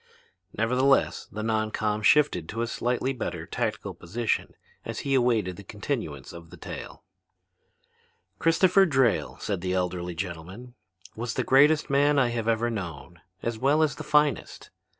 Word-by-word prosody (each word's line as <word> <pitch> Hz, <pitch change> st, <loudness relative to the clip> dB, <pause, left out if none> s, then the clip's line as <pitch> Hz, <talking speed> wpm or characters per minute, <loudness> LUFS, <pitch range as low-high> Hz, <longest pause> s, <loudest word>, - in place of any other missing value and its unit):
Nevertheless 125 Hz, +5 st, +2 dB
the 110 Hz, -, -5 dB
non 110 Hz, -1 st, 0 dB
com 105 Hz, 0 st, -1 dB
shifted 105 Hz, -, +3 dB
to 115 Hz, +2 st, -2 dB
a -, -, 0 dB
slightly 125 Hz, +3 st, -1 dB
better 130 Hz, -, -4 dB
tactical -, -, -3 dB
position 110 Hz, +6 st, -2 dB, 0.3 s
as -, -, -5 dB
he 140 Hz, -, -1 dB
awaited 115 Hz, -8 st, +2 dB
the 100 Hz, -, -10 dB
continuance 100 Hz, -, -5 dB
of 85 Hz, -1 st, -11 dB
the -, -, -12 dB
tale. -, -, -8 dB, 1.4 s
"Christopher 185 Hz, +4 st, +4 dB
Drayle," 130 Hz, -7 st, +1 dB
said 100 Hz, -4 st, -3 dB
the 90 Hz, 0 st, -1 dB
elderly 90 Hz, -1 st, -2 dB
gentleman, 95 Hz, +7 st, -7 dB, 0.4 s
"was 115 Hz, +1 st, -4 dB
the -, -, 0 dB
greatest 145 Hz, +3 st, +4 dB
man 145 Hz, +1 st, +3 dB
I 130 Hz, -3 st, +3 dB
have 115 Hz, -1 st, -3 dB
ever 115 Hz, +1 st, +1 dB
known, 85 Hz, -, -7 dB, 0.2 s
as 115 Hz, -1 st, -2 dB
well 145 Hz, +5 st, +3 dB
as 155 Hz, -, 0 dB
the -, -, -6 dB
finest. 150 Hz, -1 st, 0 dB
115 Hz, 150 wpm, -26 LUFS, 95-135 Hz, 1.4 s, Christopher